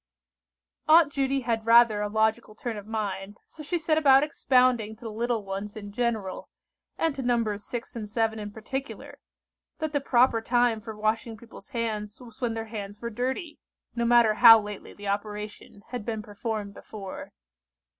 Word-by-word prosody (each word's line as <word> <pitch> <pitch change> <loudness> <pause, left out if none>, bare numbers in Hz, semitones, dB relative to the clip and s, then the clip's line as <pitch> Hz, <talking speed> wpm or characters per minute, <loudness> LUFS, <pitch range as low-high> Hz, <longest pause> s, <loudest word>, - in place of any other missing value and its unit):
Aunt 310 -2 +6
Judy 275 0 0
had 230 -2 -2
rather 230 -2 +6
a 210 - -1
logical 220 +1 0
turn 230 0 -4
of 205 0 -8
mind, 205 -2 -4
so 315 - -12
she 305 +4 -1
set 315 -1 +1
about 275 -2 +6
expounding 250 -6 +2
to 220 - -29
the 225 - -5
"little 230 -1 -2
ones" 195 +2 -5
in 205 -2 -8
general, 220 -4 -2 0.5
and 325 -2 +1
to 275 - -5
Nos. 230 -4 0
6 240 +2 -6
and 215 -3 -5
7 220 0 0
in 210 -1 -5
particular, 265 +6 -6 0.6
that 315 -1 -3
the 285 - +1
proper 245 -3 +3
time 240 -1 +2
for 220 -1 -8
washing 220 +1 -1
people's 235 +5 -14
hands 220 -4 -3
was 240 -1 -14
when 235 -2 -1
their 225 0 -4
hands 205 -2 -7
were 235 0 -5
dirty; 260 - -3 0.3
no 235 - -1
matter 235 -2 +5
how 225 0 +9
lately 210 -1 -8
the 205 0 -8
operation 210 0 -5
had 245 -3 -5
been 220 -1 -4
performed 210 -1 -5
before. 195 -2 -9
225 Hz, 175 wpm, -27 LUFS, 210-245 Hz, 0.6 s, how